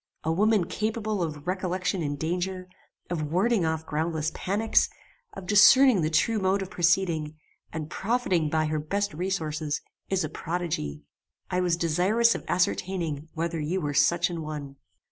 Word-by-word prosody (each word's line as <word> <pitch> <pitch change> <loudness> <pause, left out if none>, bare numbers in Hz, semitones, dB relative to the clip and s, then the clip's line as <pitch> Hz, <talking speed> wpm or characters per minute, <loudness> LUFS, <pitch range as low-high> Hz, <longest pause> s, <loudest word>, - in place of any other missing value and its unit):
A 160 - 0
woman 205 +2 +3
capable 215 0 -2
of 150 -3 -4
recollection 185 0 -1
in 145 -2 -2
danger, 180 +4 -3 0.4
of 155 -4 -2
warding 195 +2 +2
off 160 0 -2
groundless 155 0 -1
panics, 210 +4 +1 0.4
of 185 - -8
discerning 210 +3 +7
the 155 - +1
true 215 +8 +2
mode 190 +1 +1
of 190 - -10
proceeding, 170 -3 +1 0.4
and 155 -2 -4
profiting 190 -5 0
by 155 0 +1
her 155 0 -1
best 200 +7 -2
resources, 155 -4 -2 0.3
is 190 -1 +1
a - - -1
prodigy. 155 - -4 0.5
I 180 - +1
was 175 -2 +1
desirous 185 +8 +3
of - - -6
ascertaining 170 -4 -1
whether 165 0 -2
you 160 +5 -1
were 145 -4 -2
such 170 +5 +3
an 170 -1 -4
one. 145 -3 -6
175 Hz, 155 wpm, -27 LUFS, 155-190 Hz, 0.5 s, discerning